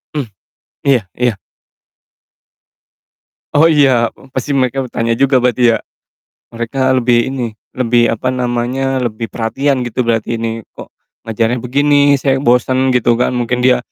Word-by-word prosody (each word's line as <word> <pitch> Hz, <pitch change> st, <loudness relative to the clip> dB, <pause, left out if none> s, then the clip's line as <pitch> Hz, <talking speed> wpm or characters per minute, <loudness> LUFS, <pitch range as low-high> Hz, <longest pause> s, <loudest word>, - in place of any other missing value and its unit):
Mhm, 135 Hz, -7 st, -3 dB, 0.5 s
iya 135 Hz, -5 st, +3 dB
iya. 120 Hz, -4 st, 0 dB, 2.2 s
Oh 145 Hz, -, +5 dB
iya, 130 Hz, -6 st, +3 dB
e -, -, -19 dB
pasti 130 Hz, +2 st, -2 dB
mereka 135 Hz, 0 st, 0 dB
bertanya 115 Hz, -2 st, -2 dB
juga 135 Hz, 0 st, +3 dB
berarti 125 Hz, -1 st, +3 dB
ya, 115 Hz, -, +1 dB, 0.7 s
mereka 125 Hz, +3 st, -1 dB
lebih 120 Hz, -1 st, +2 dB
ini, 135 Hz, -2 st, -3 dB, 0.3 s
lebih 120 Hz, -1 st, +2 dB
apa 130 Hz, +3 st, -2 dB
namanya, 125 Hz, +2 st, -1 dB
lebih 115 Hz, -3 st, -4 dB
perhatian 125 Hz, +4 st, -1 dB
gitu 120 Hz, +2 st, -2 dB
berarti 115 Hz, -1 st, -1 dB
ini, 115 Hz, -1 st, -4 dB
"Kok -, -, -11 dB, 0.3 s
ngajarin 115 Hz, +2 st, -1 dB
begini, 145 Hz, +2 st, +3 dB
saya 135 Hz, 0 st, 0 dB
bosen." 130 Hz, +2 st, +2 dB
Gitu 120 Hz, -1 st, +2 dB
kan. 120 Hz, -, 0 dB
Mungkin 120 Hz, +1 st, -1 dB
dia, 125 Hz, -1 st, +4 dB
125 Hz, 140 wpm, -15 LUFS, 115-135 Hz, 2.2 s, Oh